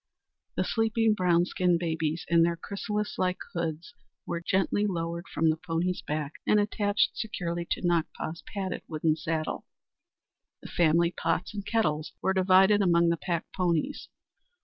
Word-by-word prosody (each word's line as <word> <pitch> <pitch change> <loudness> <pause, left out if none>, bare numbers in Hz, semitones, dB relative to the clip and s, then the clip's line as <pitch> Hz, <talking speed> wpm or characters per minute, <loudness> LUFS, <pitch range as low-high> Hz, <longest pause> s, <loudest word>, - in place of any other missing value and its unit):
The - - +1
sleeping 225 -1 +2
brown 175 -3 +3
skinned 180 -1 +1
babies 160 -1 -2
in 170 0 +4
their 170 0 +3
chrysalis 210 +3 -4
like 185 0 +1 0.2
hoods 170 +6 -3 0.3
were 170 -1 -3
gently 195 +3 +1
lowered 170 -1 -3
from 160 0 +2
the 155 - -2
pony's 175 +2 -2
back 150 -1 -3 0.2
and 210 - +5
attached 205 0 +1
securely 175 -5 -3
to - - -2
Nakpa's 170 -1 -1
padded 190 -2 -3
wooden 155 -1 +1
saddle. 160 0 -3 1.0
The - - -8
family 170 0 +3
pots 165 +3 -1
and 205 -1 -4
kettles 155 -9 0
were 190 - +1
divided 190 +2 +5
among 170 -2 +4
the 170 - +1
pack 170 0 -2
ponies. 180 - -1
175 Hz, 150 wpm, -28 LUFS, 165-195 Hz, 1.0 s, and